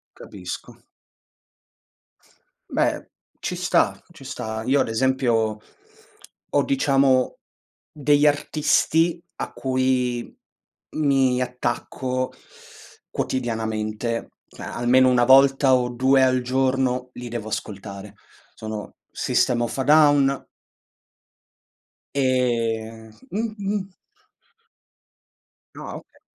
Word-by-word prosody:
Capisco. 90 -3 -9 1.9
Beh, - - -1 0.3
ci - - -3
sta, - - +1
ci - - -14
sta. 110 0 -5
Io, 135 +2 +3
ad - - 0
esempio, 115 -3 +1 0.9
ho, 145 -1 +2
diciamo, 135 -1 +2 0.5
degli 145 -1 +3
artisti 160 +3 +2
a - - -5
cui 130 -2 -1 0.6
mi 135 -4 +2
attacco 125 +1 -3 0.8
quotidianamente. 115 -2 -2 0.3
A - - -7
almeno 130 +2 +4
1 125 -1 +4
volta 135 0 +6
o 125 -1 +2
2 130 +2 +3
al 130 -1 +3
giorno 130 0 0
li 125 0 -7
devo 115 -2 -5
ascoltare. 100 -1 -6 0.4
Sono 110 -1 -7 0.2
System 120 -1 +1
of 120 - -3
a 130 - 0
Down 145 -2 +4 1.7
e 115 -4 0 0.2
mh 215 +3 -2
mh. 200 -1 -3 1.9
Ah, - - -7
okay. - - -15
130 Hz, 90 wpm, -23 LUFS, 115-135 Hz, 1.9 s, volta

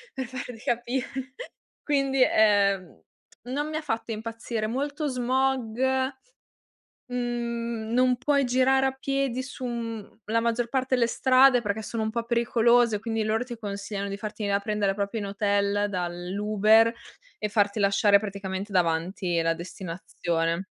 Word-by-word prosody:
per 265 - -3
farti 250 -1 -7
capire. 255 +2 -3 0.5
Quindi, 275 -2 +1
ehm, 200 - +2 0.4
non 285 +5 -3
mi 310 - -3
ha 315 - -3
fatto 230 -5 -3
impazzire, 225 0 -4
molto 285 +6 -2
smog, 255 -2 0 1.3
mhmm, 235 -2 -3
non 250 +1 +3
puoi 280 +2 +2
girare 260 +2 +3
a 265 - +1
piedi 265 -1 -1
su, 260 0 -8
mhmm, 230 -3 -5
la 225 +2 +1
maggior 235 +1 0
parte 260 0 0
delle 240 -2 +3
strade 255 0 +5
perché 210 +1 -2
sono 220 +1 -3
un 220 - -1
po' 235 +1 -2
pericolose, 235 -1 +3
quindi 225 -1 -2
loro 220 +2 0
ti 245 -1 -6
consigliano 200 -1 -4
di 200 - -4
farti 215 +1 -6
venire 200 0 +2
a - - -11
prendere 205 -2 0
proprio 200 +2 -2
in 205 - -3
hotel 200 0 +1
dall'Uber 205 +5 +2 0.5
e 210 - -1
farti 205 0 +1
lasciare 200 0 +4
praticamente 200 -1 -5
davanti 175 0 0
la 165 0 +1
destinazione. 170 0 -3
225 Hz, 145 wpm, -26 LUFS, 200-250 Hz, 1.3 s, strade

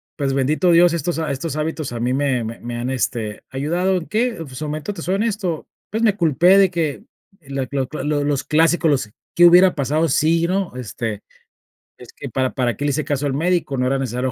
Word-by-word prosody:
pues, 140 -2 -1
bendito 150 +7 +2
Dios, 170 0 +5
estos 170 +1 -2
ha 160 - -2
estos 150 +3 -4
hábitos 155 -2 -3
a 120 - -5
mí 120 +2 0
me 135 -3 0
me 115 +1 -6
me 120 0 -6
han, 120 +2 -3
este, 115 -5 -3
ayudado, 175 +8 0
¿en 170 - -6
qué?, 235 +4 0
pues, 165 -4 -7
en 130 - -11
su 155 - -5
momento, 155 +6 -4
te - - -7
soy 185 - -1
honesto, 200 -6 -2 0.2
pues, 220 +2 -2
me 215 -3 +2
culpé 170 +3 +4
de 195 -2 +5
que 165 0 -2 0.4
la 135 -3 -4
cla 135 0 -2
cla 155 - -6
lo 150 -1 0
los 145 -1 0
clásicos, 165 +2 +2
los, 135 -7 0 0.3
¿qué 175 - +7
hubiera 180 +2 +7
pasado 150 +4 0
si 165 +4 +2
no? 185 -5 -2
Este: 115 -3 -5 0.8
"Es 125 - -13
que - - -9
para 130 +2 -1
para 125 -3 0
qué - - -6
le 145 - +1
hice 155 +2 -2
caso 145 0 -1
al 135 - -1
médico. 165 -1 0
No 125 0 +1
era 135 +1 +1
necesario 125 -1 -2
a - - -5
150 Hz, 235 wpm, -20 LUFS, 130-170 Hz, 0.8 s, qué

